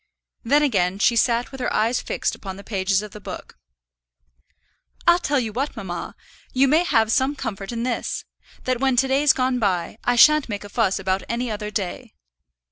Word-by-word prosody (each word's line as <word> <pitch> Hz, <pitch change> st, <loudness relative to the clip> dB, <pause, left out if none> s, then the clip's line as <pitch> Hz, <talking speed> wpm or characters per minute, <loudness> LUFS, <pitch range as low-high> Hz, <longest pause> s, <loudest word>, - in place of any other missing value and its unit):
Then 285 Hz, +5 st, +3 dB
again 195 Hz, -9 st, +1 dB
she 235 Hz, +4 st, +3 dB
sat 235 Hz, +1 st, +1 dB
with 270 Hz, -, -9 dB
her -, -, -1 dB
eyes 230 Hz, +3 st, +1 dB
fixed -, -, -2 dB
upon 190 Hz, -2 st, -8 dB
the 200 Hz, -, -10 dB
pages 195 Hz, -1 st, 0 dB
of 210 Hz, -, -9 dB
the 210 Hz, -, -11 dB
book. -, -, -9 dB, 1.5 s
"I'll 345 Hz, +1 st, +5 dB
tell 290 Hz, -5 st, 0 dB
you 225 Hz, -4 st, -3 dB
what, 275 Hz, +6 st, -2 dB
mamma, -, -, -6 dB, 0.4 s
you 265 Hz, +1 st, +4 dB
may 310 Hz, +5 st, +4 dB
have 225 Hz, -10 st, +2 dB
some 270 Hz, +4 st, +2 dB
comfort 210 Hz, -7 st, -5 dB
in 235 Hz, 0 st, -3 dB
this: 245 Hz, -2 st, -3 dB, 0.4 s
that 255 Hz, -1 st, -1 dB
when 265 Hz, -1 st, +2 dB
to 265 Hz, +2 st, +3 dB
day's 275 Hz, +2 st, +4 dB
gone 255 Hz, -1 st, 0 dB
by, 195 Hz, -1 st, -1 dB
I 245 Hz, -, +2 dB
shan't 305 Hz, +2 st, +6 dB
make 205 Hz, -1 st, -4 dB
a 205 Hz, -, -10 dB
fuss 205 Hz, -3 st, +1 dB
about 190 Hz, 0 st, -1 dB
any 235 Hz, 0 st, -2 dB
other 210 Hz, 0 st, -4 dB
day." 200 Hz, -4 st, -5 dB
235 Hz, 195 wpm, -22 LUFS, 205-265 Hz, 1.5 s, shan't